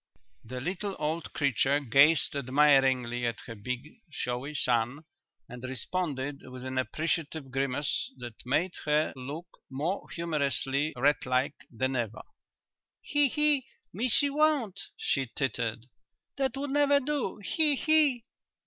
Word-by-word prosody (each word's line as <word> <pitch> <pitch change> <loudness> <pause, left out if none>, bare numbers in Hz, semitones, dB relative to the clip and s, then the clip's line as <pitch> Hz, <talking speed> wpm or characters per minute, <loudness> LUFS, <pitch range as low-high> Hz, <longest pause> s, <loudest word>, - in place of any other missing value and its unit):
The 125 +3 -6
little 190 +7 -3
old 160 +2 -3
creature 140 0 +2
gazed 140 +4 +4
admiringly 130 -3 +3
at 115 - -4
her 115 - -8
big 125 - -6
showy 140 -1 -4
son 125 +2 +1 0.4
and 125 0 -10
responded 140 +1 -3
with 130 0 -10
an 130 0 -2
appreciative 155 0 -2
grimace 135 +2 -1
that 120 -3 -9
made 160 +8 0
her 150 +1 +2
look 140 +6 -6 0.2
more 155 +9 -3
humorously 150 -3 -1
rat 145 +3 +2
like 130 +3 +1 0.2
than 130 +2 -2
ever. 115 -3 -3 0.8
"He! 290 -1 +3
he! 295 -1 +2 0.3
Missie 250 +7 +3
won't," 285 -10 +2 0.2
she 135 -3 0
tittered. 120 -4 -2 0.5
"That 270 -1 -1
would 280 0 -3
never 285 0 +4
do. 280 -6 -2
He! 295 +8 +3
he!" 295 -5 +4
145 Hz, 125 wpm, -29 LUFS, 130-195 Hz, 0.8 s, gazed